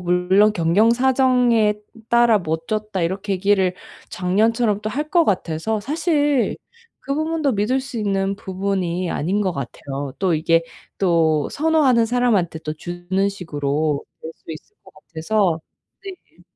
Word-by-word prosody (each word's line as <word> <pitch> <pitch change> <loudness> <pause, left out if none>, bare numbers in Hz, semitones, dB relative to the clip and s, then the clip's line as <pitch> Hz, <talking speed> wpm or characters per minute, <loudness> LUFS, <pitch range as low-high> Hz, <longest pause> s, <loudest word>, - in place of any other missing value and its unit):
물론 180 +4 +3
"경영 185 +5 +3
사정에 250 -4 +3 0.3
따라 235 -2 +4
못 160 -2 -4
줬다." 215 -3 -2
이렇게 190 +4 -2
얘기를 190 -1 +1 0.3
작년처럼 210 +3 +1
또 215 - -3
할 295 +6 -4
것 340 -2 +4
같아서 185 - -1
사실 290 - 0 0.4
그 275 - -3
부분도 315 -2 0
믿을 220 +5 0
수 260 -3 -7
있는 195 -2 -1
부분이 185 -2 -2
아닌 190 +7 -1
것 190 -3 0
같아요. 140 0 -6
또 185 -3 +1
이게 165 +1 +2 0.4
또 165 -5 +2
선호하는 290 -7 +2
사람한테 220 -9 +1
또 155 - -4
주는 175 +4 -2
식으로 150 -5 -2 0.2
될 160 - -8
수 - - -40
있을 165 - -13
것 - - -17
같아서. 170 +1 -1 0.4
네. 385 -2 -12
200 Hz, 270 characters per minute, -21 LUFS, 170-235 Hz, 0.4 s, 따라